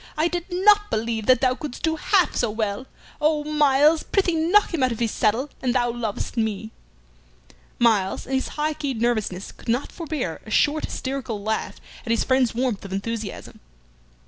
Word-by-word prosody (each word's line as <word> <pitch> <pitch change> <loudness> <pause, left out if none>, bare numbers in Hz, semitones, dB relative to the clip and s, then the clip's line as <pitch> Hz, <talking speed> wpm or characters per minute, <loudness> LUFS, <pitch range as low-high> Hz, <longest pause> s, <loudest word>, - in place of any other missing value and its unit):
I 310 +2 +3
did 350 0 -3
not 415 +3 +4
believe 220 -1 -2
that 255 -2 +5
thou 255 -2 +3
couldst 275 0 -7
do 320 -1 +1
half 365 +4 +2
so 240 - +1
well. 215 +3 -3 0.3
Oh, 300 0 +2
Myles, 300 +1 +4
prithee 380 -4 +1
knock 340 +5 +3
him 325 - -1
out 255 -1 +3
of 230 - -3
his 230 -1 0
saddle 235 +7 0
an 250 -2 0
thou 240 -2 +1
lovest 230 -2 -4
me!" 220 -1 -2 1.1
Myles, 215 -5 +2
in 270 - -6
his 265 - 0
high 305 +1 0
keyed 275 -6 -3
nervousness, 215 -5 -1
could - - -12
not 245 +4 0
forbear 305 - -4
a - - -12
short 295 +7 +2
hysterical 260 -6 -4
laugh 220 +1 -2 0.3
at 235 - -9
his 230 -1 +2
friend's 260 -3 +2
warmth 245 -4 -1
of 195 - -8
enthusiasm. 210 +1 -5
255 Hz, 180 wpm, -23 LUFS, 220-305 Hz, 1.1 s, that